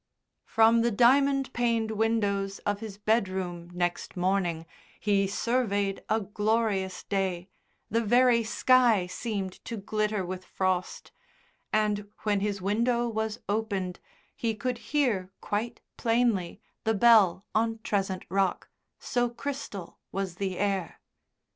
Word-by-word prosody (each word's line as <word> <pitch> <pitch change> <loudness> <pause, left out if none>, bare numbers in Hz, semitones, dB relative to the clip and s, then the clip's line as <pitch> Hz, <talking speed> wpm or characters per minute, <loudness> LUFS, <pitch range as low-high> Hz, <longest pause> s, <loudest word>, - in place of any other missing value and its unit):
From 225 +1 +4
the 235 - +3
diamond 270 +4 +3
paned 230 -2 +1
windows 205 -3 0
of 205 0 0
his 215 -3 -7
bedroom 190 -5 -1
next 175 +1 -2
morning 175 -3 0 0.3
he 200 -2 +2
surveyed 205 -3 0
a 220 - +3
glorious 205 -2 0
day, 190 -2 -2 0.4
the 230 +2 +2
very 240 +1 +4
sky 235 -3 +4
seemed 190 0 -4
to 230 - -4
glitter 210 -1 -1
with 185 +1 -5
frost, 185 -1 -2 0.6
and 210 -1 0
when 205 -2 +2
his 200 -1 -2
window 235 +4 +1
was 220 0 -3
opened 200 -4 -2 0.4
he 225 -2 -1
could 245 +3 -3
hear 240 -11 +1
quite 225 +3 -3 0.2
plainly 225 -6 +1 0.2
the 220 0 +1
bell 205 -4 +5
on 225 +1 +1
Trezent 195 -2 -1
Rock, 190 0 0 0.3
so 245 -1 0
crystal 235 -7 -6
was 190 -2 -3
the 190 -2 -2
air. 195 -3 -1
210 Hz, 120 wpm, -28 LUFS, 190-230 Hz, 0.6 s, bell